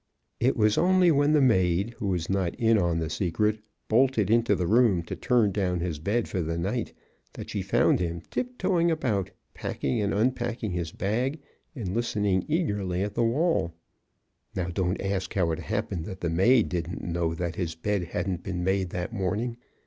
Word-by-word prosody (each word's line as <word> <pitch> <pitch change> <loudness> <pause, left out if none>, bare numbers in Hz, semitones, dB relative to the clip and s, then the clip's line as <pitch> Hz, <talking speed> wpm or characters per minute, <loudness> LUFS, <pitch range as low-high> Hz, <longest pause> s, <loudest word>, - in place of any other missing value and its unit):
It 130 +3 +2
was 105 -1 +3
only 185 -1 +5
when 145 0 +3
the 150 - +5
maid, 95 -4 +3
who 105 - -2
was 90 -4 -1
not 95 -3 0
in 115 -1 +3
on 85 -3 +1
the 80 -1 -1
secret, 100 +6 0 0.3
bolted 115 -3 +3
into 115 -2 +3
the 90 - -1
room 110 -3 +3
to - - -6
turn 120 -5 +2
down 90 -3 0
his 85 -3 -3
bed 105 +9 0
for 95 - -2
the 80 0 -2
night, 100 +8 -2 0.4
that - - -8
she - - -2
found - - +3
him 85 -1 -2
tip 250 0 -3
toeing 175 -3 +2
about, 110 - 0 0.2
packing 70 +9 -2
and 100 - 0
unpacking 120 -1 0
his 85 -3 -3
bag 125 - -1 0.4
and 100 -9 -4
listening 105 -5 0
eagerly 105 - 0
at 105 0 -3
the 120 - 0
wall. 115 - +1 0.8
(Now 90 -1 -1
don't 90 +1 -1
ask 95 -1 -2
how 90 -4 +2
it 80 - -2
happened 100 -5 -3
that 95 -2 -8
the 85 - -1
maid 110 +7 +4
didn't 85 0 -3
know 85 -1 -1
that 85 0 -3
his 85 -3 -3
bed 100 +2 -1
hadn't 90 +1 -3
been 90 -1 -4
made 95 0 +1
that 90 +5 -4
morning. 110 +4 -2
100 Hz, 185 wpm, -27 LUFS, 90-120 Hz, 0.8 s, only